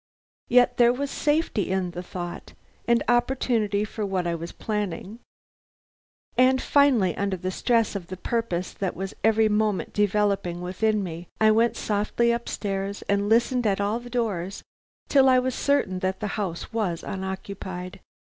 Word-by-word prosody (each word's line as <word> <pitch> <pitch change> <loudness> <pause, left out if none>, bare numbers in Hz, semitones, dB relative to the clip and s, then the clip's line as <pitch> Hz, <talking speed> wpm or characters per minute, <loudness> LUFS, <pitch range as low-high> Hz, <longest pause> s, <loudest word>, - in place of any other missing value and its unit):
Yet 245 0 +4
there 240 -1 +6
was 275 +3 -3
safety 295 - 0
in 185 -1 -1
the 175 - -6
thought, 175 -1 -7 0.3
and 235 0 +3
opportunity 240 -4 +1
for 215 +1 -5
what 190 -3 -1
I 170 - 0
was 170 +1 -5
planning, 210 0 -4 1.2
and 260 +1 +4
finally, 255 - +3
under 200 -1 -1
the 185 +1 -3
stress 230 +2 +1
of 180 -4 -5
the 185 - -7
purpose 190 -4 -2
that 190 -3 -3
was 190 +1 -5
every 220 0 +4
moment 210 -2 0
developing 205 -4 +1
within 205 +4 0
me, 170 -1 -6
I 220 0 +6
went 230 +1 +2
softly 215 +3 +1
up 235 0 -4
stairs 195 0 -3
and 200 0 0
listened 240 +1 +3
at 195 -1 +1
all 205 +3 0
the 245 0 -11
doors 205 -7 -2 0.4
till 270 -2 +5
I 255 - +6
was 255 0 +1
certain 225 -11 +1
that 190 0 -2
the 210 - -3
house 190 -1 -4
was 195 -7 -1
unoccupied. 190 -1 -6
205 Hz, 160 wpm, -25 LUFS, 185-235 Hz, 1.2 s, there